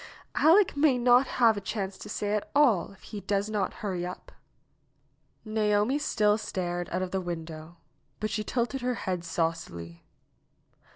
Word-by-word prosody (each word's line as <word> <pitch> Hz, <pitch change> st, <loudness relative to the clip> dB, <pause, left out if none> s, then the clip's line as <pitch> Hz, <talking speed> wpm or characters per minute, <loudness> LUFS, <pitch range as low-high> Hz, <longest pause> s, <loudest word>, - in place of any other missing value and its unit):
''Aleck 350 Hz, +4 st, +5 dB
may 285 Hz, -3 st, +4 dB
not 245 Hz, +2 st, +5 dB
have 230 Hz, -3 st, +5 dB
a -, -, -3 dB
chance 195 Hz, -1 st, -3 dB
to -, -, -9 dB
say 205 Hz, 0 st, -2 dB
at 210 Hz, -, -2 dB
all, 250 Hz, -13 st, +4 dB
if 195 Hz, -, -19 dB
he 210 Hz, -2 st, -7 dB
does 200 Hz, +2 st, -1 dB
not 210 Hz, -2 st, 0 dB
hurry 185 Hz, -3 st, -2 dB
up." 180 Hz, +1 st, -7 dB, 1.1 s
Naomi 215 Hz, +4 st, +1 dB
still 210 Hz, -7 st, +2 dB
stared 175 Hz, -3 st, -3 dB
out 185 Hz, +2 st, -1 dB
of 185 Hz, -, -4 dB
the 190 Hz, -, -1 dB
window, 165 Hz, -1 st, -7 dB, 0.4 s
but 215 Hz, +1 st, -2 dB
she 215 Hz, -, -1 dB
tilted 245 Hz, +4 st, -1 dB
her 250 Hz, 0 st, 0 dB
head 180 Hz, -2 st, -2 dB
saucily. 160 Hz, -, -3 dB
205 Hz, 160 wpm, -28 LUFS, 175-235 Hz, 1.1 s, Aleck